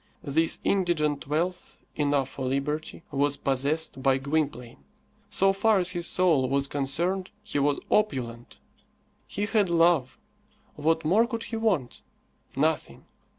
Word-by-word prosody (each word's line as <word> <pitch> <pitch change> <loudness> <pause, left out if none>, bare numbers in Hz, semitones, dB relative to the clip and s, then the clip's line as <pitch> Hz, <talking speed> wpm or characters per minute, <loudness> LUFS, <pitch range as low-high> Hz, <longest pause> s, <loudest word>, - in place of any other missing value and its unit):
This 160 +3 +2
indigent 155 -8 0
wealth, 175 +5 -2 0.2
enough 145 -3 +1
for 130 -2 -5
liberty, 150 +5 -3
was 145 +1 +1
possessed 140 +2 -1
by 135 -1 +3
Gwynplaine. 135 -4 -3 0.5
So 195 -1 +3
far 215 +2 +3
as 185 -1 +1
his 175 -2 -3
soul 160 -8 +2
was 140 0 +1
concerned, 170 +8 -1
he 210 -9 -2
was 145 0 +1
opulent. 125 - -1 0.7
He 205 - -2
had 210 -3 +1
love. 165 -6 +3 0.6
What 160 +2 0
more 210 +9 +4
could 230 -2 -4
he 230 - -5
want? 200 - -1 0.5
Nothing. - - -1
155 Hz, 130 wpm, -27 LUFS, 140-185 Hz, 0.7 s, more